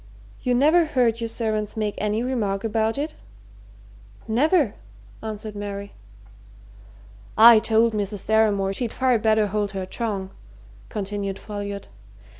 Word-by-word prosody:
You 250 Hz, -1 st, +1 dB
never 310 Hz, +6 st, +4 dB
heard 245 Hz, -6 st, +1 dB
your 230 Hz, -, -1 dB
servants 215 Hz, -2 st, -2 dB
make 210 Hz, -1 st, -1 dB
any 210 Hz, +2 st, 0 dB
remark 215 Hz, -6 st, -1 dB
about 220 Hz, +1 st, 0 dB
it?" 300 Hz, +2 st, -3 dB, 1.1 s
"Never!" 285 Hz, -, +2 dB, 0.5 s
answered 215 Hz, -1 st, -6 dB
Mary. 200 Hz, 0 st, -6 dB, 1.4 s
"I 225 Hz, 0 st, +9 dB
told 225 Hz, +1 st, +3 dB
Mrs. 205 Hz, -1 st, -3 dB
Deramore 205 Hz, -3 st, +2 dB
she'd 235 Hz, +2 st, -3 dB
far 255 Hz, -3 st, +2 dB
better 215 Hz, -1 st, +3 dB
hold 205 Hz, 0 st, -2 dB
her 190 Hz, -1 st, -3 dB
tongue," 195 Hz, -2 st, -3 dB, 0.6 s
continued 200 Hz, -1 st, -4 dB
Folliot. 200 Hz, -1 st, -6 dB
215 Hz, 120 wpm, -23 LUFS, 205-235 Hz, 1.4 s, I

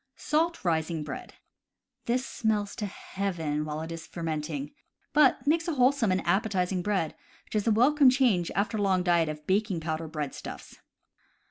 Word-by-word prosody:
Salt 325 Hz, -, 0 dB
rising 160 Hz, -1 st, 0 dB
Bread. -, -, -7 dB, 0.3 s
— -, -, -55 dB
This 250 Hz, +2 st, +1 dB
smells 210 Hz, -4 st, -1 dB
to 210 Hz, -, -2 dB
heaven 170 Hz, -7 st, -3 dB
while 155 Hz, 0 st, -4 dB
it 160 Hz, +1 st, -6 dB
is 165 Hz, -1 st, -7 dB
fermenting, 155 Hz, -3 st, -4 dB, 0.4 s
but 295 Hz, -2 st, +4 dB
makes 330 Hz, +4 st, +2 dB
wholesome 260 Hz, -, +3 dB
and 185 Hz, -, 0 dB
appetizing 190 Hz, -1 st, +1 dB
bread, 190 Hz, -5 st, 0 dB, 0.3 s
which -, -, -13 dB
is 215 Hz, 0 st, 0 dB
a -, -, +5 dB
welcome 270 Hz, +5 st, +5 dB
change 245 Hz, -10 st, +2 dB
after 210 Hz, +2 st, 0 dB
a -, -, -1 dB
long 190 Hz, -2 st, +2 dB
diet 170 Hz, -3 st, +3 dB
of 150 Hz, 0 st, -7 dB
baking 195 Hz, -1 st, +1 dB
powder 160 Hz, 0 st, -3 dB
breadstuffs. 150 Hz, -3 st, -6 dB
190 Hz, 160 wpm, -28 LUFS, 160-230 Hz, 0.4 s, a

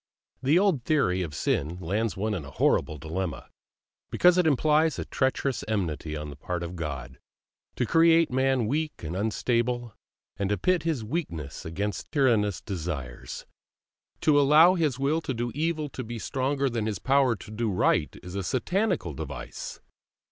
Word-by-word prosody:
The 140 Hz, +5 st, +4 dB
old 185 Hz, -, +2 dB
theory 105 Hz, -12 st, +2 dB
of 80 Hz, -5 st, -4 dB
sin 80 Hz, +5 st, -1 dB
lands 100 Hz, +6 st, -1 dB
one 105 Hz, +2 st, -1 dB
in 90 Hz, -7 st, -3 dB
a 70 Hz, -, -9 dB
horrible 75 Hz, +3 st, +1 dB
dilemma, 85 Hz, +1 st, -4 dB, 0.6 s
because 180 Hz, 0 st, +5 dB
it 175 Hz, -, +3 dB
implies 155 Hz, +2 st, +3 dB
a -, -, -3 dB
treacherous 130 Hz, -1 st, 0 dB
enmity 80 Hz, -7 st, -2 dB
on 75 Hz, -1 st, -6 dB
the -, -, -9 dB
part 90 Hz, +5 st, -4 dB
of 85 Hz, +1 st, -5 dB
God, 70 Hz, -6 st, -5 dB, 0.6 s
to -, -, 0 dB
create 165 Hz, -1 st, +5 dB
man 130 Hz, -2 st, +2 dB
weak 150 Hz, -, -2 dB
and 80 Hz, +3 st, -4 dB
unstable, 120 Hz, +3 st, 0 dB, 0.4 s
and 100 Hz, -1 st, -1 dB
to 105 Hz, -, +1 dB
pit 185 Hz, -2 st, +2 dB
his 155 Hz, -7 st, -1 dB
weakness 105 Hz, -, -4 dB
against 100 Hz, +6 st, -4 dB
tyrannous 115 Hz, -, +2 dB
desires; 80 Hz, -, -5 dB, 0.8 s
to 150 Hz, -2 st, +5 dB
allow 155 Hz, +5 st, +7 dB
his 155 Hz, -8 st, 0 dB
will 145 Hz, +4 st, +1 dB
to 135 Hz, -, -3 dB
do 120 Hz, +1 st, -2 dB
evil 155 Hz, 0 st, -1 dB
to 130 Hz, -1 st, -6 dB
be 120 Hz, +1 st, -6 dB
stronger 135 Hz, +4 st, -1 dB
than 115 Hz, -4 st, -1 dB
his 105 Hz, -3 st, -2 dB
power 135 Hz, +1 st, +3 dB
to 105 Hz, -, -11 dB
do 115 Hz, +1 st, -1 dB
right, 95 Hz, -, +1 dB
is 90 Hz, -, -8 dB
a 100 Hz, -, -2 dB
satanical 150 Hz, -, 0 dB
device. -, -, -7 dB
115 Hz, 165 wpm, -27 LUFS, 90-145 Hz, 0.8 s, allow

